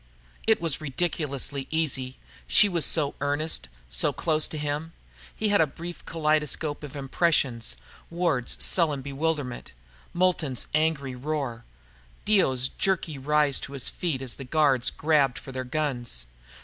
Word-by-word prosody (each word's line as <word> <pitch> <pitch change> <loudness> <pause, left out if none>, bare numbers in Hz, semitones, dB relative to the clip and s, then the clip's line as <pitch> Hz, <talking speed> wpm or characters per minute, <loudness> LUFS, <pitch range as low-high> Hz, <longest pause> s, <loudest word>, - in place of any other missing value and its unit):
It 220 - +5
was 165 -3 -2
ridiculously 140 -2 -2
easy, 135 -5 -1 0.3
she 210 - +7
was 170 -6 +1
so 145 -4 +2
earnest, 145 - -1 0.2
so 60 +1 +2
close 155 -2 +2
to 155 - -6
him. 150 +2 -3 0.4
He 215 - 0
had 205 -4 +4
a 160 - +4
brief 170 +4 -8
kaleidoscope 150 -2 0
of 145 -1 -8
impressions 135 - +1 0.3
Ward's 170 -8 0
sullen 150 -6 +2
bewilderment, 140 - -3 0.4
Moulton's 170 -7 +1
angry 155 -4 +1
roar, 125 -3 -3 0.6
Dio's 130 -12 +3
jerky 170 -6 0
rise 150 0 +3
to 140 - -7
his 135 -3 0
feet 150 -7 -2
as 125 - -4
the 135 - -7
guards 135 -2 +3
grabbed 145 -5 +2
for 135 - -8
their 130 0 -4
guns. 125 - -2
145 Hz, 135 wpm, -26 LUFS, 130-160 Hz, 0.6 s, she